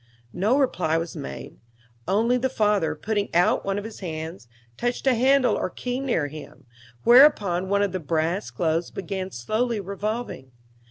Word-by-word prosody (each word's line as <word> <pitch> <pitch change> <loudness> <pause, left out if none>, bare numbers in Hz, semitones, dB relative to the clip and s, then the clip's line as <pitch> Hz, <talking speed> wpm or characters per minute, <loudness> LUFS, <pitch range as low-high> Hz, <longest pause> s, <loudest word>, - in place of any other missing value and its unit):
No 210 +9 +2
reply 180 - +1
was 165 0 -4
made; 65 0 -8 0.5
only 225 +6 +2
the 255 +1 0
father, 210 -8 +1
putting 210 -2 -2
out 175 +1 +3
one 195 0 -1
of 205 - -3
his 220 0 -9
hands, 160 -5 -6 0.3
touched 245 - -2
a 265 - +5
handle 260 +2 +3
or - - -2
key 250 0 -4
near 245 - 0
him, 150 -1 -10 0.4
whereupon 205 -9 +5
one 200 0 +2
of 200 - 0
the 185 - -3
brass 165 +4 -1
globes 165 -1 -1
began 190 0 -5
slowly 215 - -1
revolving. 200 - -5
200 Hz, 160 wpm, -24 LUFS, 165-235 Hz, 0.5 s, a